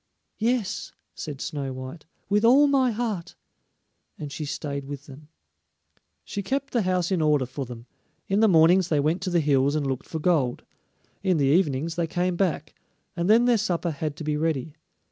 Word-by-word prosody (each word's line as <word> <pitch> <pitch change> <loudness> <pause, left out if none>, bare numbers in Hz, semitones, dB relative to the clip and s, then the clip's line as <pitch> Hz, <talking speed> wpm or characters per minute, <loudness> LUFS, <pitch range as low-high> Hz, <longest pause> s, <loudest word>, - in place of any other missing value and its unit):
"Yes," 225 -3 -1 0.2
said 145 -4 -7
Snow 140 -4 -4
white, 130 +5 -8 0.2
"with 205 +1 +2
all 260 +5 +7
my 275 -3 +3
heart," 215 -6 -3 0.8
and 145 -2 -6
she 145 +3 -5
stayed 140 -1 -4
with 140 0 -7
them. 145 +2 -13 1.0
She 200 - -4
kept 275 +7 -3
the 240 - +2
house 180 -2 0
in 180 -4 +1
order 150 -3 +3
for 130 +2 -5
them; 120 -1 -10 0.4
in 195 +1 +1
the 220 - +5
mornings 175 0 +5
they 150 - +2
went 155 +6 +1
to 190 - -2
the 175 -1 +2
hills 140 -1 +2
and 150 -2 0
looked 135 -2 -3
for 160 - -4
gold; 150 -7 +1 0.6
in 185 -3 +2
the 140 - +2
evenings 155 +1 +1
they 170 -1 0
came 180 +2 -1
back, 170 -5 -1 0.4
and 170 +2 -1
then 230 +3 +6
their 240 -3 +4
supper 175 -4 -1
had 150 0 -4
to 160 - -7
be 150 0 -1
ready. 155 -2 -1
165 Hz, 185 wpm, -25 LUFS, 145-195 Hz, 1.0 s, all